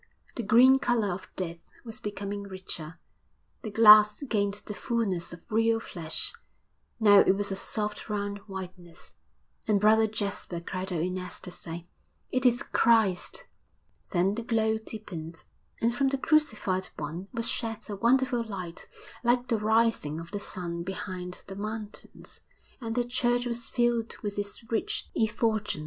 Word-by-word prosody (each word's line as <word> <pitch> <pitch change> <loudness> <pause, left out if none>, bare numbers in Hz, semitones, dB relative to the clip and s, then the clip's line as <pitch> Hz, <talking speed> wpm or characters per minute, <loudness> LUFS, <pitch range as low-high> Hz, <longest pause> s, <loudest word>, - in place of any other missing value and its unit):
The - - -2
green 250 +5 +6
colour 235 -8 +1
of 185 - -8
death 170 -2 -5 0.2
was 225 -2 -7
becoming 200 0 -4
richer, 185 -5 -7 0.6
the 220 - -5
glass 210 +2 +7
gained 205 -6 0
the 210 - -5
fulness 195 -4 -1
of 170 0 -10
real 225 +1 +3
flesh; 170 - 0 0.7
now 205 -3 +7
it 190 - +5
was 200 0 -2
a - - -1
soft 210 +2 -2
round 205 -1 -2
whiteness. 180 -3 -9 0.5
And 210 -2 +3
Brother 220 +2 +5
Jasper 200 -4 -3
cried 185 +2 -4
out 170 -3 -1
in 185 +1 -2
ecstasy, 175 -2 -7 0.4
'It 255 0 +3
is 245 0 +2
Christ!' 220 -6 +2 0.6
Then 185 +1 +2
the 230 - -3
glow 220 -1 +1
deepened, 180 -7 -8 0.4
and 230 +1 +2
from 270 +3 +1
the 275 0 +1
Crucified 220 - +1
One 160 +5 -5
was 230 -2 -1
shed 225 -1 -2
a 210 - -4
wonderful 245 +3 +2
light 185 -6 -7 0.4
like 245 +1 +2
the 230 -3 +2
rising 215 -8 +2
of 165 0 -9
the 205 - -3
sun 175 -4 -4
behind 180 -1 -5
the 195 - -8
mountains, 215 +1 -7 0.4
and 225 -1 -3
the 245 -1 +1
church 245 0 +1
was 235 -1 -2
filled 240 -2 0
with 205 -1 -3
its 205 +3 -5
rich 225 - -1
effulgence. 220 -4 0
210 Hz, 150 wpm, -28 LUFS, 185-230 Hz, 0.7 s, glass